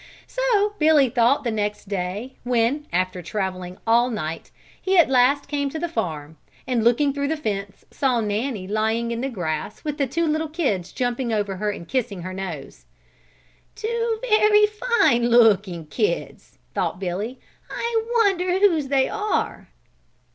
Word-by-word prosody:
So 435 Hz, -5 st, +1 dB
Billy 305 Hz, -4 st, +5 dB
thought 245 Hz, +2 st, +3 dB
the 235 Hz, -, -1 dB
next 210 Hz, -1 st, -3 dB
day, 200 Hz, +6 st, -4 dB
when, 245 Hz, +5 st, 0 dB
after 185 Hz, 0 st, -1 dB
traveling 185 Hz, 0 st, -4 dB
all 235 Hz, +2 st, +4 dB
night, 165 Hz, -8 st, -4 dB, 0.3 s
he 380 Hz, 0 st, +1 dB
at 340 Hz, -, +6 dB
last 265 Hz, +3 st, +3 dB
came 285 Hz, -1 st, -1 dB
to 315 Hz, -, -5 dB
the 345 Hz, +2 st, -2 dB
farm 160 Hz, -, -4 dB, 0.3 s
and 245 Hz, -3 st, 0 dB
looking 255 Hz, +5 st, +3 dB
through 280 Hz, 0 st, -1 dB
the 320 Hz, +2 st, -1 dB
fence 200 Hz, -7 st, -4 dB
saw 260 Hz, -4 st, +1 dB
Nanny 210 Hz, -1 st, -2 dB
lying 220 Hz, +3 st, 0 dB
in 235 Hz, 0 st, -3 dB
the 270 Hz, -, -1 dB
grass 175 Hz, -, -4 dB
with 300 Hz, -1 st, -4 dB
the 275 Hz, -, +2 dB
two 330 Hz, +7 st, 0 dB
little 315 Hz, 0 st, 0 dB
kids 260 Hz, -, -1 dB
jumping 245 Hz, -1 st, -2 dB
over 205 Hz, -3 st, -1 dB
her 210 Hz, +2 st, -1 dB
and 170 Hz, -5 st, -6 dB
kissing 210 Hz, -9 st, -2 dB
her 185 Hz, +1 st, -5 dB
nose. 155 Hz, -, -7 dB, 0.9 s
"Two 460 Hz, 0 st, -1 dB
very 425 Hz, -1 st, +5 dB
fine 420 Hz, -, +2 dB
looking 205 Hz, -8 st, +4 dB
kids," 425 Hz, -, -3 dB, 0.2 s
thought -, -, -1 dB
Billy. 195 Hz, +7 st, -4 dB, 0.3 s
"I 465 Hz, -1 st, -1 dB, 0.2 s
wonder 365 Hz, -2 st, +1 dB
whose 340 Hz, -8 st, +3 dB
they 270 Hz, -1 st, +2 dB
are." 425 Hz, 0 st, -2 dB
240 Hz, 155 wpm, -23 LUFS, 200-310 Hz, 0.9 s, at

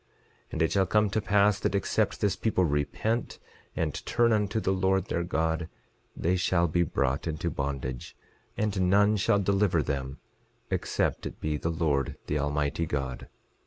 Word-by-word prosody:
11:23 -, -, -23 dB
And 80 Hz, -, -2 dB
it 80 Hz, -, +1 dB
shall 95 Hz, -1 st, +3 dB
come 105 Hz, -1 st, +3 dB
to 110 Hz, -, 0 dB
pass 100 Hz, 0 st, +3 dB
that -, -, 0 dB
except 100 Hz, -, 0 dB
this 100 Hz, -2 st, +2 dB
people 95 Hz, -2 st, +1 dB
repent 75 Hz, +10 st, -1 dB, 0.4 s
and 75 Hz, -3 st, -1 dB
turn 115 Hz, -1 st, +2 dB
unto 105 Hz, 0 st, +1 dB
the 95 Hz, -3 st, 0 dB
Lord 95 Hz, 0 st, +1 dB
their 85 Hz, -, 0 dB
God, 80 Hz, -1 st, -1 dB, 0.5 s
they 90 Hz, +3 st, +1 dB
shall 90 Hz, -1 st, +2 dB
be 85 Hz, +2 st, +1 dB
brought 70 Hz, -3 st, 0 dB
into 80 Hz, +2 st, -2 dB
bondage; 65 Hz, -3 st, -4 dB, 0.4 s
and 100 Hz, -4 st, +1 dB
none 100 Hz, +2 st, +4 dB
shall 100 Hz, 0 st, +2 dB
deliver 100 Hz, -4 st, +2 dB
them, 70 Hz, 0 st, -3 dB, 0.5 s
except -, -, -1 dB
it -, -, -10 dB
be 75 Hz, -1 st, -1 dB
the 80 Hz, +3 st, -2 dB
Lord 80 Hz, -5 st, 0 dB
the 75 Hz, -, -1 dB
Almighty 75 Hz, +3 st, -1 dB
God. 70 Hz, -4 st, -3 dB
85 Hz, 165 wpm, -28 LUFS, 75-100 Hz, 0.5 s, none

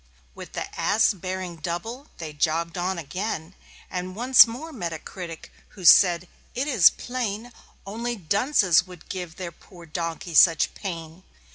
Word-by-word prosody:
With -, -, -11 dB
the -, -, -3 dB
Ass 220 Hz, 0 st, +3 dB
bearing 185 Hz, -2 st, -5 dB
double 200 Hz, -, -5 dB
they 160 Hz, -2 st, -7 dB
jogged 165 Hz, +2 st, -1 dB
on 180 Hz, +1 st, -2 dB
again, 170 Hz, +2 st, -5 dB, 0.3 s
And 185 Hz, 0 st, -5 dB
once 250 Hz, +3 st, +7 dB
more 290 Hz, +8 st, -8 dB
met 175 Hz, -10 st, -4 dB
a -, -, -4 dB
critic, 170 Hz, 0 st, -9 dB, 0.3 s
who 185 Hz, -, -8 dB
said: 175 Hz, 0 st, +6 dB, 0.3 s
"It 265 Hz, +4 st, -1 dB
is 225 Hz, -, +7 dB
plain 240 Hz, -2 st, -5 dB, 0.3 s
Only 235 Hz, +4 st, -4 dB
dunces 195 Hz, -, +2 dB
would 180 Hz, -3 st, -14 dB
give 180 Hz, -3 st, -6 dB
their 180 Hz, -2 st, -6 dB
poor 175 Hz, +1 st, -16 dB
donkey 165 Hz, +1 st, -5 dB
such 165 Hz, -1 st, +5 dB
pain. 165 Hz, -3 st, -7 dB
180 Hz, 150 wpm, -25 LUFS, 170-220 Hz, 0.3 s, once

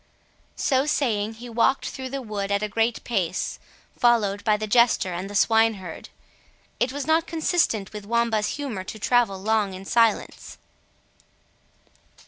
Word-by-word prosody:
So 270 Hz, +1 st, +1 dB
saying, 225 Hz, -7 st, 0 dB
he 240 Hz, +2 st, -10 dB
walked 235 Hz, +3 st, +1 dB
through 260 Hz, -1 st, -6 dB
the 270 Hz, 0 st, -5 dB
wood 205 Hz, -3 st, -4 dB
at 200 Hz, +1 st, +1 dB
a -, -, 0 dB
great 225 Hz, +3 st, 0 dB
pace, 190 Hz, -7 st, -2 dB, 0.4 s
followed 210 Hz, -4 st, +2 dB
by 215 Hz, -2 st, +3 dB
the 215 Hz, -, -3 dB
jester 220 Hz, -4 st, +3 dB
and 185 Hz, +3 st, -5 dB
the 205 Hz, -, -8 dB
swineherd. 220 Hz, -5 st, +1 dB, 0.7 s
It 250 Hz, -, +1 dB
was 285 Hz, 0 st, -4 dB
not 320 Hz, +2 st, +2 dB
consistent 320 Hz, -, 0 dB
with 210 Hz, -1 st, -8 dB
Wamba's 230 Hz, -1 st, 0 dB
humour 255 Hz, -10 st, -4 dB
to 205 Hz, -, -8 dB
travel 220 Hz, -3 st, +1 dB
long 210 Hz, -1 st, 0 dB
in 190 Hz, +1 st, -9 dB
silence. 230 Hz, 0 st, 0 dB
225 Hz, 145 wpm, -24 LUFS, 200-245 Hz, 0.7 s, by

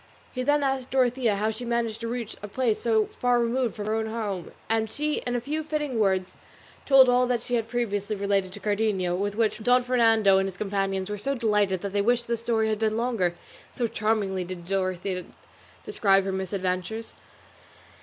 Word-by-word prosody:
He 255 Hz, -, -3 dB
then 290 Hz, +3 st, +2 dB
asked 265 Hz, -2 st, -1 dB
Dorothea 250 Hz, -4 st, +2 dB
how 215 Hz, +2 st, 0 dB
she 220 Hz, +3 st, -7 dB
had 240 Hz, -, -5 dB
managed 230 Hz, -2 st, -1 dB
to 230 Hz, -, -3 dB
reach 235 Hz, -2 st, -4 dB
a 205 Hz, -, -6 dB
place 230 Hz, 0 st, 0 dB
so 220 Hz, -2 st, +2 dB
far 245 Hz, -1 st, +3 dB
removed 240 Hz, 0 st, 0 dB
from 210 Hz, -, -5 dB
her 215 Hz, -, -1 dB
own 220 Hz, 0 st, -1 dB
home, 210 Hz, -5 st, -4 dB, 0.2 s
and 220 Hz, 0 st, 0 dB
she 300 Hz, +5 st, -1 dB
in 245 Hz, -, -1 dB
a -, -, +1 dB
few 300 Hz, +6 st, -3 dB
fitting 295 Hz, -5 st, -2 dB
words 190 Hz, -3 st, +1 dB, 0.5 s
told 270 Hz, -2 st, +8 dB
all 250 Hz, 0 st, +4 dB
that 240 Hz, -2 st, 0 dB
she 245 Hz, -, -6 dB
had 230 Hz, -2 st, +1 dB
previously 215 Hz, -3 st, -2 dB
related 200 Hz, -2 st, 0 dB
to 205 Hz, -, -8 dB
Cardenio, 205 Hz, -3 st, 0 dB
with 200 Hz, +2 st, -2 dB
which 220 Hz, 0 st, 0 dB
Don 245 Hz, +2 st, +4 dB
Fernando 225 Hz, -5 st, +4 dB
and 195 Hz, -, 0 dB
his 190 Hz, -1 st, -7 dB
companions 195 Hz, -2 st, -1 dB
were 210 Hz, -, -4 dB
so 275 Hz, +7 st, -1 dB
delighted 210 Hz, -6 st, +1 dB
that 200 Hz, -1 st, -4 dB
they 205 Hz, -, +2 dB
wished 240 Hz, +3 st, +2 dB
the 235 Hz, -, 0 dB
story 225 Hz, -1 st, 0 dB
had 215 Hz, -1 st, -1 dB
been 220 Hz, 0 st, +1 dB
longer; 225 Hz, -8 st, 0 dB, 0.4 s
so 245 Hz, -, -1 dB
charmingly 210 Hz, -4 st, 0 dB
did 180 Hz, -1 st, -8 dB
Dorothea 185 Hz, -1 st, -2 dB, 0.6 s
describe 195 Hz, -2 st, +3 dB
her 195 Hz, -, -2 dB
misadventures. 190 Hz, +3 st, -3 dB
220 Hz, 200 wpm, -26 LUFS, 195-240 Hz, 0.6 s, told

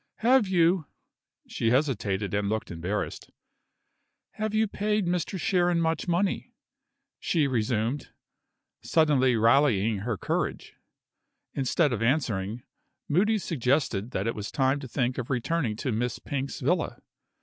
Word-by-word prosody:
"Have 245 Hz, -1 st, +4 dB
you 175 Hz, -3 st, +2 dB, 0.3 s
" -, -, -65 dB, 0.3 s
she 115 Hz, -, -1 dB
hesitated 110 Hz, -7 st, 0 dB
and 100 Hz, 0 st, 0 dB
looked 110 Hz, 0 st, -2 dB
embarrassed. 90 Hz, +5 st, -4 dB, 1.0 s
"Have 215 Hz, 0 st, -3 dB
you 220 Hz, 0 st, +3 dB
paid 210 Hz, 0 st, 0 dB
Mr. 180 Hz, +2 st, -1 dB
Sharon 175 Hz, -1 st, +2 dB
much 165 Hz, +1 st, 0 dB
money?" 195 Hz, +7 st, -1 dB, 0.6 s
she 160 Hz, -4 st, +1 dB
resumed, 120 Hz, +1 st, -1 dB, 0.7 s
suddenly 140 Hz, -6 st, +3 dB
rallying 115 Hz, -3 st, +3 dB
her 110 Hz, +1 st, -2 dB
courage. -, -, -2 dB, 0.8 s
Instead 140 Hz, +2 st, +1 dB
of 115 Hz, -, -3 dB
answering, 115 Hz, -4 st, 0 dB, 0.4 s
Moody 210 Hz, +8 st, +2 dB
suggested 130 Hz, -, 0 dB
that 95 Hz, -5 st, -2 dB
it 115 Hz, -, 0 dB
was 105 Hz, -1 st, -5 dB
time 135 Hz, -1 st, +1 dB
to 135 Hz, -, -7 dB
think 125 Hz, +1 st, -1 dB
of 125 Hz, -, -5 dB
returning 130 Hz, -2 st, -1 dB
to 130 Hz, +4 st, -3 dB
Miss 120 Hz, +2 st, -1 dB
Pink's 140 Hz, -1 st, -4 dB
villa. 160 Hz, +5 st, 0 dB
135 Hz, 130 wpm, -27 LUFS, 115-170 Hz, 1.0 s, Have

